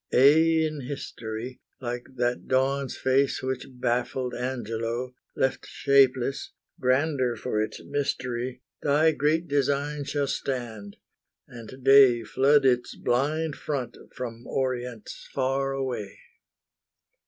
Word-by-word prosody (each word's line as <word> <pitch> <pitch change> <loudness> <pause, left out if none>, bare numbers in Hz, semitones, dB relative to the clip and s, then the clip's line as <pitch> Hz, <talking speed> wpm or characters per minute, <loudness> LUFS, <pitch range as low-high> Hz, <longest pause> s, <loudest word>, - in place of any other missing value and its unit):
Aye 160 +5 +5
in 155 -2 -6
history, 120 -3 -6 0.2
Like 120 -1 -4
that 120 0 -1
Dawn's 135 +1 +1
face 130 +1 +1
which 130 -1 -3
baffled 125 0 -1
Angelo, 120 0 -3 0.2
Left 130 - 0
shapeless, 135 -1 +2 0.3
grander 130 -1 +1
for 110 -1 -2
its 110 0 -4
mystery, 130 -3 -3 0.2
Thy 150 +3 +4
great 155 +3 +1
Design 145 +1 0
shall 145 0 -1
stand, 115 -7 -4 0.5
and 125 +2 -11
day 135 -3 +7
Flood 135 +6 +3
its 125 -2 +2
blind 145 +5 0
front 140 -5 -4 0.2
from 120 -2 -6
Orients 125 -4 -3
far 135 +1 0
away. 125 -7 -4
130 Hz, 110 wpm, -26 LUFS, 120-140 Hz, 0.5 s, day